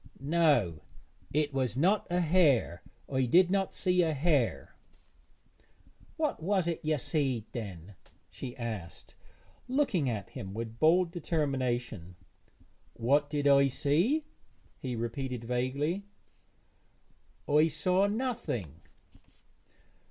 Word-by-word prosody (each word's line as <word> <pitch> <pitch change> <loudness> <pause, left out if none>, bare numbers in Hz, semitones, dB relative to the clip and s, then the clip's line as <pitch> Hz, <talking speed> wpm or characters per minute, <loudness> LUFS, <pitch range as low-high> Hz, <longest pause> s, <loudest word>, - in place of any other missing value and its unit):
'No, 140 - +2 0.5
it 150 -1 0
was 130 -3 -1
not 190 +9 +2
a 175 +1 +1
hare; 150 - +3 0.3
I 130 -1 0
did 180 +7 +5
not 195 -1 +1
see 180 -1 +2
a 160 -3 +1
hare.' 145 -5 0 1.4
'What 305 - -1
was't 175 -2 0
ye 155 0 +1
seed 135 -5 -1
then?' 100 -5 -7 0.3
she 125 -1 -8
asked, 110 -8 -6 0.5
looking 250 - +1
at 105 -5 -4
him 95 0 -7
with 115 0 -6
bold 170 +2 +4
determination. 130 - -2 0.8
'What 145 +5 +2
did 145 -1 0
I 140 0 +6
see?' 175 - +1 0.5
he 125 -2 -4
repeated 120 +1 -4
vaguely, 140 - -2 1.4
'I 150 +2 +4
saw 180 +6 +1
nothing.' 210 - -3
145 Hz, 105 wpm, -30 LUFS, 120-175 Hz, 1.4 s, I